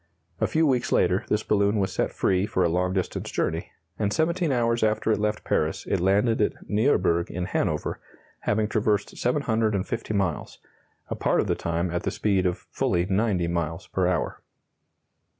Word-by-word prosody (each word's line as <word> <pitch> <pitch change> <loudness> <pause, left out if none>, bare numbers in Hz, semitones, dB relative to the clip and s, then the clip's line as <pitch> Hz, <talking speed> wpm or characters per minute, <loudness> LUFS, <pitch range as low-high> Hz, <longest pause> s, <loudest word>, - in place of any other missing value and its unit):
A - - +2
few 160 +1 +2
weeks 130 -4 +1
later 90 +4 +2
this 105 0 +1
balloon 100 0 +2
was 95 -2 0
set - - 0
free 95 +1 +1
for 95 - +1
a 85 - +3
long 90 +2 +1
distance 95 -1 -2
journey, 80 +2 -2 0.3
and 100 -2 +1
17 170 - +1
hours 115 -2 +1
after 110 0 +1
it 110 - +1
left 105 0 -1
Paris - - 0
it 95 - +1
landed 100 +5 +2
at 105 - +2
Nieuburg 95 -7 +2
in 90 0 -3
Hanover, - - -1 0.4
having 105 +1 0
traversed 105 -2 0
750 115 -4 0
miles, 95 -5 -1 0.5
a - - -2
part - - +1
of - - +2
the - - +1
time 85 +1 -2
at 85 +1 -1
the - - -1
speed 95 -3 +1
of 90 - -3
fully 85 0 +1
90 95 -2 +1
miles 85 -1 -2
per 95 -2 0
hour. 90 -2 -1
100 Hz, 175 wpm, -25 LUFS, 90-110 Hz, 0.5 s, a